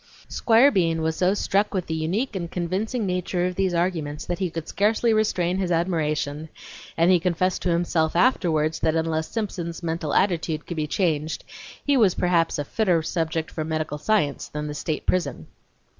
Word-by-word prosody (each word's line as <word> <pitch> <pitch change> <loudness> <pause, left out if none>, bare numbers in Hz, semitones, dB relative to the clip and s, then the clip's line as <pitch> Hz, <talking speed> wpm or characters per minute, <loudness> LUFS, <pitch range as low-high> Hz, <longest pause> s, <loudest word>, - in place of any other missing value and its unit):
Squire 240 +5 +4
Bean 165 - +1
was 160 0 0
so 185 +2 +2
struck 205 +1 0
with 185 - -1
the 160 - -4
unique 190 +10 -1
and 170 -3 -3
convincing 195 +7 -2
nature 180 -1 -1
of 180 - -1
these 185 -1 0
arguments 165 -4 -1
that 175 - -3
he 185 -2 0
could 165 -1 -6
scarcely 220 +3 +2
restrain 190 -4 +1
his 185 -2 -1
admiration, 155 -3 -1 0.5
and 170 +2 +4
he 180 - +5
confessed 180 +1 0
to 180 - 0
himself 170 -2 +1
afterward, 165 -7 +2
that 160 0 +2
unless 160 -1 0
Simpson's 180 -6 -4
mental 160 -2 -2
attitude 165 -5 +1
could 170 - -6
be 155 -1 -1
changed 155 -2 -1 0.4
he 285 - +3
was 205 -7 +4
perhaps 170 -2 +1
a 145 - -2
fitter 180 -3 +1
subject 160 -1 -2
for 155 - -3
medical 155 -1 -3
science 150 -5 0
than 150 0 -5
the 150 - -4
state 150 +1 -3
prison. 140 - -1
170 Hz, 180 wpm, -24 LUFS, 160-185 Hz, 0.5 s, he